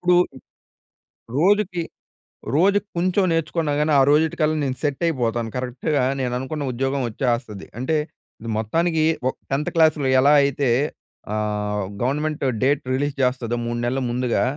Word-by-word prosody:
ఇప్పుడు 180 0 +3 1.2
రోజుకి 190 0 +2 0.7
రోజుకి 200 +5 +3
కొంచెం 185 +3 +2
నేర్చుకున్నా 165 -1 -1
గాని 150 +1 +1
ఆ - - +6
రోజుటి 155 +2 +3
కల్లా 155 0 +2
నేను 130 -2 -1
సెట్ 145 -1 -2
అయిపోతాను. 120 -7 -1
కరెక్ట్‌గా 125 +2 -1 0.2
నేను 125 -2 -1
అనుకున్న 145 +3 -4
ఉద్యోగం 135 +3 -1
వచ్చేస్తది. 115 -3 -2
అంటే, 145 +5 0 0.5
ఇది 115 - -6
మొత్తానికి 160 +9 +1 0.2
ఒ - - +3 0.2
10థ్ 140 +2 -1
క్లాస్‌లొ 155 -4 +3
ఎలా 145 +2 +5
అయితే 140 -2 0 0.6
ఆహ్, 105 -1 -1 0.2
గవర్నమెంట్ 150 +4 -1 0.2
డేట్ 140 +2 +2
రిలీజ్ 145 +1 -1
చేస్తాదో 125 -2 0
3 120 0 -2
నెలల 130 +2 -1
ముందుగా, 125 0 0
140 Hz, 135 wpm, -22 LUFS, 125-155 Hz, 1.2 s, ఆ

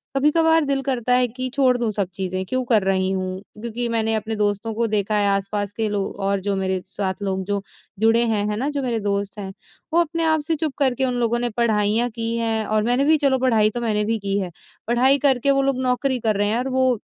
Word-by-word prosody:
कभी-कभार 320 +2 +3
दिल 275 -1 0
करता 250 -3 0
है 250 0 +3
कि 255 +3 -5
छोड़ 260 -3 +3
दूँ 235 -2 -1
सब 200 -3 -1
चीज़ें 185 0 -3
क्यों 255 +5 -1
कर 215 -4 +4
रही 190 -1 +1
हूँ। 185 0 -3 0.2
क्योंकि 235 +1 -3
मैंने 225 -1 0
अपने 220 +1 -2
दोस्तों 210 +1 -1
को 230 +1 0
देखा 210 0 0
है 205 -1 +2
आस-पास 200 +1 -1
के 220 -1 0
लोग 200 -1 -2
और 195 0 0
जो 200 - +1
मेरे 190 -1 -1
साथ 190 -1 -3
लोग 190 -1 -1
जो 200 0 -1 0.4
जुड़े 225 +2 +4
हैं 210 -2 0
है 210 - -1
ना 275 +5 -1
जो 285 -1 -2
मेरे 235 -3 -1
दोस्त 200 0 -2
हैं। 190 -1 -5 0.4
वो 340 - +5
अपने 335 0 0
आप 315 0 +3
से 325 - +1
चुप 310 -2 -2
करके 265 -1 +2
उन 250 - -1
लोगों 235 0 +1
ने 240 0 -1
पढ़ाइयाँ 220 +1 +2
की 230 0 -3
हैं 225 -2 -1
और 215 0 +1
मैंने 245 +4 +2
भी 315 +1 +5
चलो 275 -3 +2
पढ़ाई 225 -5 +3
तो 240 +2 -5
मैंने 210 -2 0
भी 225 +1 0
की 200 0 -1
है। 185 -3 -4 0.4
पढ़ाई 255 +4 +4
करके 270 +1 +3
वो 275 - +3
लोग 270 -1 0
नौकरी 255 0 0
कर 215 -2 +1
रहे 205 0 +1
हैं 225 - +1
और 260 +2 -2
वो 260 -2 +2
225 Hz, 240 wpm, -22 LUFS, 205-255 Hz, 0.4 s, वो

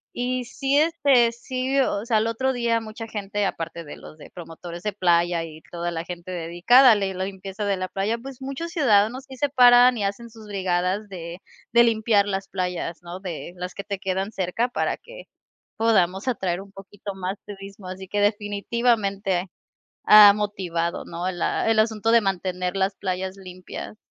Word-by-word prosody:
Y 250 +1 -1
sí, 270 +3 -1
este, 285 -7 +4
sí, 255 +3 -2
o 215 -5 0
sea, 230 -2 +2
al 215 +1 +1
otro 260 +4 0
día 235 -2 0
mucha 225 +1 -8
gente, 205 -1 -3
aparte 165 -2 -4
de 145 - -9
los 155 - -13
de 150 - -13
promotores 170 0 -9
de 210 - -1
playa 175 -3 +2
y 160 -1 -11
toda 170 -1 -3
gente 175 +1 -8
dedicada 180 +10 +5
a - - +6
le 195 -2 -1
la 185 0 -3
limpieza 195 +1 -6
de 200 -1 0
la 185 0 -3
playa, 200 +5 -1
pues, 265 +2 -10
muchos 275 +6 -5
ciudadanos 250 - +2
sí 265 - -10
se 290 - +1
paran 245 -2 +6
y 210 - -2
hacen 200 +4 -3
sus 220 -1 -14
brigadas 190 +1 -1
de 175 -2 -8 0.3
de 235 0 +6
limpiar 220 -3 +2
las 195 -1 -3
playas, 180 -2 -3
¿no?, 175 +2 -8
de 175 -2 -6
las 180 0 -6
que 200 - -7
te 200 -2 -4
quedan 190 +2 -2
cerca 190 +6 -1
para 245 - -1
que - - -13 0.5
podamos 195 -3 +2
atraer 185 -8 -1
un 195 0 -12
poquito 195 +1 -9
más 190 +1 -4
turismo, 195 -1 -10
así 185 0 -8
que 205 - -1
definitivamente 205 -2 0 0.5
ha 210 -1 +9
motivado, 185 -5 -2
¿no?, 175 +2 -3
la 180 +5 0
el 220 - +3
asunto 220 0 +1
de 235 - +7
mantener 185 -2 -2
las 195 +1 0
playas 190 0 -3
limpias. 185 +2 -9
200 Hz, 180 wpm, -24 LUFS, 185-230 Hz, 0.5 s, ha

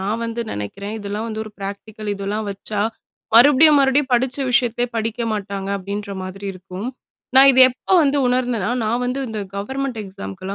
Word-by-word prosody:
நான் 210 +4 -2
வந்து 230 +1 -3
நெனக்கிறேன். 195 - -5
இதெல்லாம் 205 +2 -4
வந்து, 220 0 -4
ஒரு 215 - -10
பிராக்டிகல் 205 +2 -7
இதெல்லா 200 +2 -3
வச்சா, 200 +1 -4 0.5
மறுபடியும், 290 +4 +7
மறுபடியும், 270 0 +2
படிச்ச 255 +2 +1
விஷயத்தையே 245 0 +1
படிக்க 225 +1 -2
மாட்டாங்க. 200 -1 -4
அப்படின்ற 200 +2 -5
மாதிரி 195 +2 -7
இருக்கும். 185 +4 -7 0.5
நான் 275 +1 +9
இத 260 - +1
எப்ப 315 +9 -1
வந்து 285 0 +2
உணர்ந்தேன்னா, 245 -4 0
நான் 235 +3 0
வந்து 255 +2 -2
இந்த 215 -1 -4 0.2
கவர்மெண்ட் 265 +3 -3
எக்ஸாமு 95 - -8
க்குலா, 195 +1 -5
220 Hz, 165 wpm, -20 LUFS, 200-250 Hz, 0.5 s, நான்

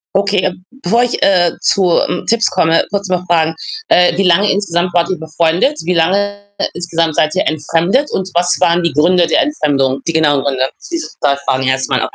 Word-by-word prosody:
Okay, 200 -1 +1
äh, 185 - 0 0.3
bevor 230 +7 +2
ich, 245 - -2
äh, 175 -3 +3
zu, 180 -4 +2
hm, 180 - -4
Tipps 230 -1 +2
komme, 165 -3 +2
kurz 200 -1 -2
noch 180 -1 -1
Fragen: 160 -2 +1 0.3
Äh, 175 -1 +3
wie 195 - +1
lange 190 +3 +3
insgesamt 175 -3 -1
wart 170 -1 +1
ihr 185 - -2
befreundet? 165 - 0
Wie 180 +1 0
lange 200 +5 0 0.4
insgesamt 165 -2 -2
seid 155 0 +1
ihr - - 0
entfremdet 170 - 0
und 190 0 -3
was 175 0 +2
waren 175 -1 +2
die 170 - 0
Gründe 175 +4 +3
der 165 - +2
Entfremdung, 140 - 0
die 165 - -1
genauen 145 -4 +2
Gründe? 135 -1 -1 0.2
Dieses 335 -1 -5
2 140 -1 +2
Fragen 130 0 0
erst 130 +1 -1
mal. 130 -2 0
175 Hz, 200 wpm, -14 LUFS, 160-190 Hz, 0.4 s, äh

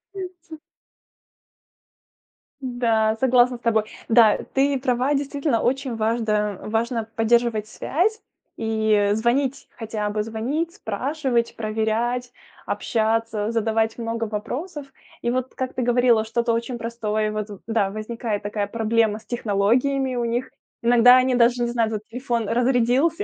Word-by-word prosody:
И - - -6 0.2
ц. 330 -2 -14 2.1
Да. 230 -4 +1
Согласна 250 -1 +4
с - - -24
тобой. 220 -2 +1 0.2
Да. 225 -2 +6 0.2
Ты 275 0 +2
права. 255 +2 +1
Действительно, 280 -2 0
очень 260 -1 -1
важда 215 -2 0
важно 225 +1 -1
поддерживать 225 -1 +2
связь. 405 - -1 0.3
И 220 -2 +1
звонить, 255 +5 0
хотя 215 -2 -3
бы 210 0 -1
звонить, 255 +10 -3
спрашивать, 245 +2 -1
проверять, 225 +3 -1 0.4
общаться, 220 -1 0
задавать 225 0 0
много 230 0 -2
вопросов. 270 - -5 0.4
И 235 - +1
вот 255 0 -3
как 260 -1 -3
ты 255 - -2
говорила, 240 -2 +3
что-то 235 +1 0
очень 235 +1 -2
простое 215 -2 -2
вот 215 0 -3 0.2
да, 220 -3 +1
возникает 215 0 -4
такая 205 0 -2
проблема 225 0 +1
с 220 - -15
технологиями 245 +5 +1
у 240 - 0
них. 240 +3 -2 0.3
Иногда 245 +1 +7
они 255 0 +2
даже 240 0 +3
не - - +1
знают 230 -2 0
вот 210 - -4
телефон 240 -3 -2
разрядился, 250 - +2
235 Hz, 130 wpm, -23 LUFS, 220-250 Hz, 2.1 s, Иногда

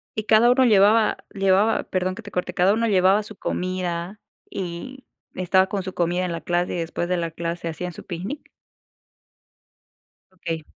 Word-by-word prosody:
Y 215 - -2
cada 225 +3 +5
uno 260 0 +4
llevaba 215 0 +4 0.2
llevaba, 195 +2 +2
perdón 185 0 -2
que 225 - -8
te 205 - -10
corte, 180 0 -3
¿cada 190 +2 +3
uno 230 +1 +1
llevaba 195 +1 +4
su 215 - -11
comida, 185 +1 -3 0.3
y 195 +9 -6 0.3
estaba 185 +1 +3
con 195 -1 -3
su 190 0 -6
comida 175 +1 0
en 180 - -3
la 165 - -4
clase, 175 0 -1
y - - -2
después 165 +1 -3
de 180 0 0
la 165 -1 -2
clase 170 0 -4
hacían 175 +2 -5
su - - -11
picnic? 195 - -6 1.9
Okey. 165 -3 -5
185 Hz, 175 wpm, -23 LUFS, 175-205 Hz, 1.9 s, cada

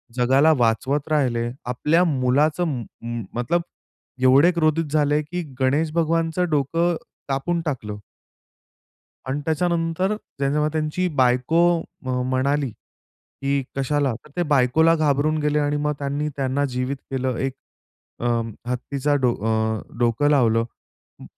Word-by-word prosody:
जगाला 135 +5 +4
वाचवत 130 +5 +1
राहिले. 120 -5 +1 0.2
आपल्या 150 +8 +2
मुलाचं 150 +3 +2
म 125 -6 -3 0.2
म 115 -1 -4
मतलब 125 +9 0 0.6
एवढे 140 +7 +6
क्रोधित 165 -1 +1
झाले 150 0 +2
की 175 +4 -4 0.2
गणेश 145 +5 +1
भगवानचं 165 +1 +1
डोकं 165 +4 +1 0.3
कापून 165 +5 -1
टाकलं. 110 -8 -4 1.3
अन् 140 +3 -2
त्याच्यानंतर 170 +4 0 0.2
ज्यांच्यामध्ये 150 +3 0
त्यांची 155 +4 -1
बायको 125 +5 +2 0.5
म 130 - -3 0.2
म्हणाली 140 +1 +1 0.5
की 140 0 -2
"कशाला?" 135 -1 +1
तर 150 - -17
ते 175 - +1
बायकोला 145 +5 +4
घाबरून 155 0 +1
गेले 150 0 +1
आणि 145 0 0
मग 150 0 0
त्यांनी 145 +1 -2
त्यांना 135 +1 0
जीवित 125 +2 -1
केलं, 130 -2 -1
1 135 -1 -1 0.7
अ, 120 - -2 0.4
हत्तीचा 135 +3 -1
डो 125 -2 +3
अ, 110 -1 0 0.2
डोकं 120 +5 +2
लावलं. 115 -5 +3 0.6
म - - -10
145 Hz, 125 wpm, -23 LUFS, 130-155 Hz, 1.3 s, एवढे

